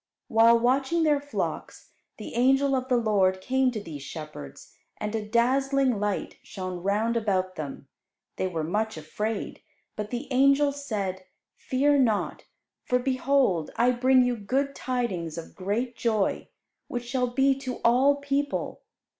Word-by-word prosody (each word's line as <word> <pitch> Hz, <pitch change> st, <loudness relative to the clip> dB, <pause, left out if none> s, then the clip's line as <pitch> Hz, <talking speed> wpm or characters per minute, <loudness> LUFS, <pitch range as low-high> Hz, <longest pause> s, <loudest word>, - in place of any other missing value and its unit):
While 230 Hz, +1 st, +6 dB
watching 265 Hz, +7 st, +1 dB
their 295 Hz, -2 st, +3 dB
flocks, 290 Hz, 0 st, -5 dB, 0.3 s
the -, -, -8 dB
angel 270 Hz, +3 st, +3 dB
of 255 Hz, 0 st, -2 dB
the 250 Hz, -, +3 dB
Lord 200 Hz, -5 st, +2 dB
came 260 Hz, +6 st, +1 dB
to 235 Hz, -3 st, -4 dB
these 160 Hz, -8 st, -8 dB
shepherds, 140 Hz, -, -9 dB, 0.2 s
and 210 Hz, 0 st, -4 dB
a 220 Hz, -1 st, -1 dB
dazzling 255 Hz, +2 st, +2 dB
light 205 Hz, -1 st, -2 dB
shone 185 Hz, -3 st, -6 dB
round 210 Hz, +5 st, 0 dB
about 190 Hz, -5 st, 0 dB
them. 140 Hz, -2 st, -7 dB, 0.5 s
They 185 Hz, -, 0 dB
were 165 Hz, -4 st, -3 dB
much 210 Hz, +5 st, -1 dB
afraid; 210 Hz, +8 st, -4 dB, 0.3 s
but 210 Hz, 0 st, -4 dB
the 245 Hz, +4 st, -4 dB
angel 275 Hz, +2 st, +4 dB
said, 200 Hz, -10 st, -4 dB, 0.3 s
"Fear 285 Hz, +2 st, +2 dB
not; 225 Hz, -6 st, 0 dB, 0.4 s
for 250 Hz, -, +1 dB
behold 255 Hz, -, +1 dB
I 245 Hz, +2 st, +3 dB
bring 255 Hz, +1 st, +4 dB
you 245 Hz, 0 st, +1 dB
good 270 Hz, +7 st, -1 dB
tidings 195 Hz, -, -3 dB
of 165 Hz, -, -8 dB
great 220 Hz, +6 st, -2 dB
joy, 220 Hz, -5 st, 0 dB, 0.4 s
which 245 Hz, 0 st, -4 dB
shall 250 Hz, +1 st, 0 dB
be 270 Hz, +3 st, +3 dB
to 260 Hz, -2 st, -4 dB
all 260 Hz, +4 st, +5 dB
people. 285 Hz, 0 st, -2 dB
235 Hz, 145 wpm, -26 LUFS, 200-265 Hz, 0.5 s, While